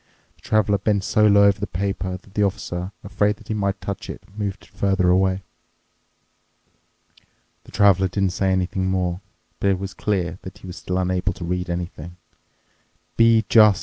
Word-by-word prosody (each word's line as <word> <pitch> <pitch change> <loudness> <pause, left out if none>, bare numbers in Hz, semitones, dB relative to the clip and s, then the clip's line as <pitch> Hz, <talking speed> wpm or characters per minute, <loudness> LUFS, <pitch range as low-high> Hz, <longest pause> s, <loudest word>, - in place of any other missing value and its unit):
The - - -28
Traveler 105 -2 +2
bent 100 -1 +1
so 105 +2 +3
low 100 -1 +6
over 100 0 +4
the 105 - -3
paper 95 0 -3
that 95 +1 -21
the 105 - 0
Officer, 95 -2 -2
afraid 105 +1 +1
that 110 +1 -19
he - - 0
might 100 -2 -1
touch 100 +3 -6
it, - - -7
moved 100 -2 -4
it - - -19
further 95 -2 +1
away. 95 +1 +2 2.2
The - - -15
Traveler 95 -2 +4
didn't 95 0 0
say 95 +1 0
anything 95 0 0
more, 90 -1 -1 0.4
but 100 - +2
it 95 - +2
was 95 0 -6
clear 95 -4 -2
that 95 - -10
he - - -14
was 90 0 -8
still 90 - -3
unable 90 0 0
to 90 - -7
read 90 +1 -2
anything. 85 -1 -5 0.5
" - - -42
'Be 115 -1 +5
just! 105 -4 +6
95 Hz, 180 wpm, -22 LUFS, 90-100 Hz, 2.2 s, low